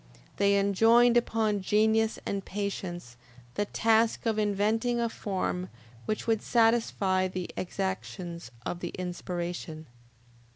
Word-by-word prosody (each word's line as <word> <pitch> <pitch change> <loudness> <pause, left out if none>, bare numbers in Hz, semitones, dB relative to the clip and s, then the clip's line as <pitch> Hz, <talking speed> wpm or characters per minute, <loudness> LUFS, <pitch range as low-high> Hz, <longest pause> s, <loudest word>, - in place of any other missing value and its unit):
They 200 0 +4
enjoined 225 +5 +5
upon 220 -3 +1
genius 220 +3 +2
and 200 -1 -2
patience 180 -10 -5 0.4
the 205 - -1
task 225 +2 +2
of 220 -1 +1
inventing 215 +4 +1
a 235 - +1
form 185 -4 -3 0.4
which 215 - -2
would 225 -2 +1
satisfy 225 -5 +2
the 185 -1 -5
exactions 185 - -4 0.2
of 175 - -3
the 175 - -4
inspiration. 175 -3 -5
200 Hz, 115 wpm, -29 LUFS, 185-225 Hz, 0.4 s, enjoined